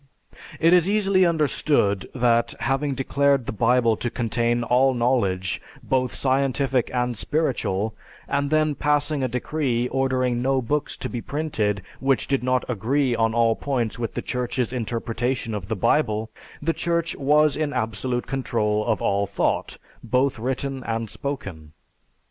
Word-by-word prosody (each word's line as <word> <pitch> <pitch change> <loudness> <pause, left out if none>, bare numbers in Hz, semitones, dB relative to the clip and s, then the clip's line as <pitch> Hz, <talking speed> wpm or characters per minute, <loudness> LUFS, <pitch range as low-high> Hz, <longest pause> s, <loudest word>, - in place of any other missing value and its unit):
It 165 +2 +5
is 180 +1 +5
easily 195 -3 +3
understood 145 - +1
that 120 -2 +2
having 135 +1 0
declared 140 0 +1
the - - -3
Bible 115 +1 +3
to 120 - -2
contain 120 0 0
all 130 +2 +3
knowledge 100 -7 0 0.2
both 130 -1 0
scientific 135 -1 +1
and 125 -1 -1
spiritual, 110 -7 -1 0.3
and 140 0 0
then 155 0 +2
passing 145 +1 0
a 130 - +1
decree 125 0 -1
ordering 130 -2 0
no 135 +1 +2
books 145 +4 -1
to - - -4
be 120 - -5
printed 110 - -2 0.2
which 135 -1 +1
did 135 -2 0
not 130 0 +1
agree 125 +3 0
on 115 0 +1
all 115 -1 +3
points 125 -5 -2
with 115 -2 -3
the - - -3
Church's 125 -1 -2
interpretation 120 0 -2
of 100 -3 -4
the 110 - -2
Bible, 110 0 +1 0.3
the 165 +2 +1
Church 170 +1 -1
was 150 +1 +3
in 155 -2 -1
absolute 120 +1 -2
control 110 -5 0
of 110 -1 -1
all 100 0 +1
thought, 100 - -1 0.3
both 125 +2 +1
written 130 +2 -3
and 115 -1 -3
spoken. 95 - -6
125 Hz, 150 wpm, -24 LUFS, 115-140 Hz, 0.3 s, It